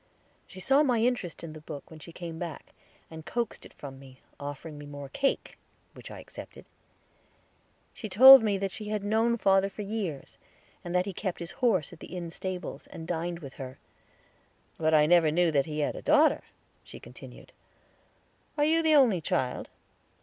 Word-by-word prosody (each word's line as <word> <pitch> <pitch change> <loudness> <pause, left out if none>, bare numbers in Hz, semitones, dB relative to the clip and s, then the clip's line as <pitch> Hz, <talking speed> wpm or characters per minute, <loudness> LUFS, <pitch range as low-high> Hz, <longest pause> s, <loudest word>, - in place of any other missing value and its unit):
She 190 - -12
saw 270 +9 +3
my 255 -5 +2
interest 225 -9 -1
in 160 -2 -7
the 155 - -11
book 150 -1 -9
when 160 - -11
she 170 - -11
came 165 -1 -7
back, 170 -4 -7 0.4
and 160 0 -9
coaxed 235 +5 -4
it - - -23
from 135 -2 -9
me, 130 -1 -15 0.2
offering 145 +2 -7
me 145 - -9
more 145 -1 -8
cake, 275 - -2 0.3
which - - -11
I - - -9
accepted. - - -11 1.3
She 215 - -7
told 260 +6 +10
me 210 -3 +1
that 195 0 -2
she 210 +2 -8
had 210 -1 -2
known 225 +3 +2
father 195 -2 +3
for 205 +2 -7
years, 195 -9 -5 0.4
and 175 +1 -5
that 180 0 +2
he 200 - -5
kept 185 -1 -3
his 170 +1 -7
horse 215 - 0
at 165 - -13
the 185 - -9
inn 170 -2 -5
stables, 185 0 -6
and 165 0 -9
dined 170 0 -3
with 135 -3 -9
her. 130 0 -8 1.0
"But 160 0 +3
I 150 -1 +6
never 170 -1 +5
knew 170 +2 +2
that 140 0 +1
he 150 -1 -3
had 145 - -1
a - - -7
daughter," 300 0 +4 0.4
she - - -12
continued. - - -13 1.1
"Are 295 - +3
you 325 +2 +3
the 315 -1 +4
only 235 - +4
child?" 130 -4 -2
175 Hz, 185 wpm, -28 LUFS, 155-220 Hz, 1.3 s, told